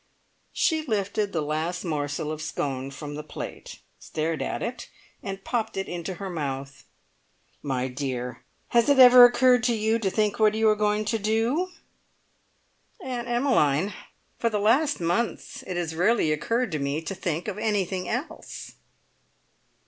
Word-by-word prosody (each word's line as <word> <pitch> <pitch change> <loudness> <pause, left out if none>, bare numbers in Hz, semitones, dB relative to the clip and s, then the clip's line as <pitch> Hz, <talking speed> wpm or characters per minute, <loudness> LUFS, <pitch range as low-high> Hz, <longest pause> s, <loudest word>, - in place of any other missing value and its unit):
She 320 -3 +1
lifted 205 -4 -1
the 160 -4 -1
last 160 +4 -2
morsel 150 -1 -2
of 155 0 -5
scone 135 -3 -3
from 145 +1 -7
the 150 - -5
plate, 150 - -8 0.2
stared 160 0 -3
at - - -3
it, 235 0 -5 0.3
and 195 -1 -6
popped 225 -3 -2
it 195 - -2
into 175 +1 -5
her 195 +3 -6
mouth. 140 -5 -5 0.8
"My 130 -2 -1
dear, 125 -2 -4 0.3
has 235 +2 +3
it 285 - +5
ever 250 -1 +10
occurred 245 0 +4
to 240 - +2
you 220 +1 +1
to 200 -4 0
think 210 +2 0
what 215 -1 +4
you 220 0 +3
are 215 - +4
going 210 0 +1
to 225 +1 0
do?" 225 - +1 1.3
"Aunt 250 -7 -5
Emmeline, 210 - +2 0.5
for 230 - +2
the 215 - -1
last 260 +9 +2
months 175 +7 -2
it 180 -2 -3
has 165 -2 -2
rarely 180 0 +2
occurred 230 +9 0
to 155 - -2
me 140 +3 -2
to 195 - -4
think 170 -1 -3
of 210 0 -4
anything 190 -4 -1
else!" 245 +8 -5
195 Hz, 155 wpm, -26 LUFS, 155-230 Hz, 1.3 s, ever